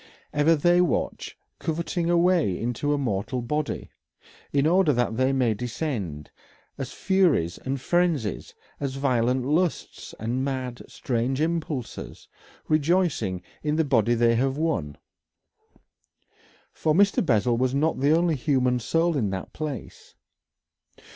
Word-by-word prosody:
Ever 150 +3 +4
they 175 +4 +4
watch, 180 - -2 0.2
coveting 170 +1 -2
a 175 - +3
way 170 - +2
into 125 +5 -1
a 145 - +2
mortal 125 -1 -2
body, 150 +4 -3 0.6
in 140 0 +2
order 175 0 +4
that 120 -3 0
they 130 +2 +2
may 125 -4 +2
descend, 105 - -4 0.4
as 135 -2 -5
furies 175 - +1
and 135 +1 -3
frenzies, 160 - 0 0.2
as 135 -2 -3
violent 130 -2 +1
lusts 160 +5 -1
and 120 +4 -2
mad, 130 -3 -3
strange 125 +2 -2
impulses, 160 -5 -3 0.4
rejoicing 155 - +1 0.2
in 150 0 0
the 160 0 +2
body 120 -4 +2
they 115 0 +3
have 135 +3 0
won. 120 - -1 1.8
For 155 -1 0
Mr. 200 +2 +4
Bessel 120 - +2
was 130 +1 +1
not 155 +1 +1
the 140 +2 +2
only 170 -1 +2
human 125 -2 +1
soul 165 +7 +1
in 110 -8 0
that 95 -1 -5
place. 150 -5 -7
135 Hz, 130 wpm, -25 LUFS, 120-160 Hz, 1.8 s, Ever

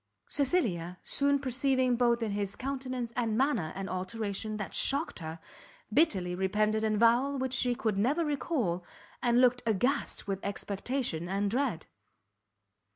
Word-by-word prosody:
Cecilia, 210 - 0
soon 280 0 +2
perceiving 260 -1 +1
both 235 -1 +2
in 215 - -1
his 200 -1 -2
countenance 255 -3 -4
and 225 -3 0
manner 240 - +1
an 195 0 -4
alteration 205 +3 -3
that 210 - -5
shocked 280 +4 +1
her, 160 -1 -6 0.6
bitterly 190 - +2
repented 210 +4 +1
an 215 -1 +2
avowal 240 +5 +3
she 250 -2 +1
could 215 -4 -1
never 290 +10 +2
recall, 250 - -1 0.4
and 240 0 +3
looked 250 -1 +4
aghast 245 +5 0
with 195 -1 -2
expectation 200 -2 -2
and 200 +1 0
dread. 240 - -1
230 Hz, 135 wpm, -30 LUFS, 195-265 Hz, 0.6 s, looked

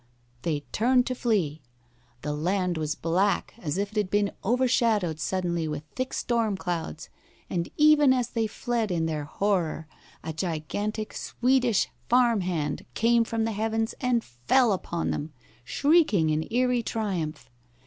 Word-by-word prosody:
They 150 +1 -1
turned 250 +2 +3
to 255 - -1
flee. 195 - 0 0.6
The 150 - -2
land 180 +4 0
was 155 -1 -2
black, 185 +5 0
as 160 -4 -3
if 200 +1 -1
it 215 - -8
had 205 -3 +1
been 205 0 +1
overshadowed 230 - +2
suddenly 170 -1 -1
with 150 -1 -4
thick 255 0 -2
storm 230 -4 0
clouds, 170 -3 -4 0.4
and 170 -2 -1
even 300 -2 +6
as 250 -2 +1
they 225 -2 0
fled 230 0 -2
in 170 -3 0
their 155 -2 -2
horror 170 -2 -1 0.4
a 160 - -4
gigantic 190 +6 -3
Swedish 250 -3 +1 0.2
farm 240 -3 +4
hand 165 -5 -2
came 235 +1 +4
from 225 0 -1
the 225 - 0
heavens 225 +1 -1
and 245 -3 +1
fell 200 - +2
upon 170 -2 -2
them, 150 +1 -4 0.3
shrieking 280 - +3
in 155 +1 -1
eerie 250 +1 +2
triumph. 180 - -3
205 Hz, 150 wpm, -27 LUFS, 160-235 Hz, 0.6 s, even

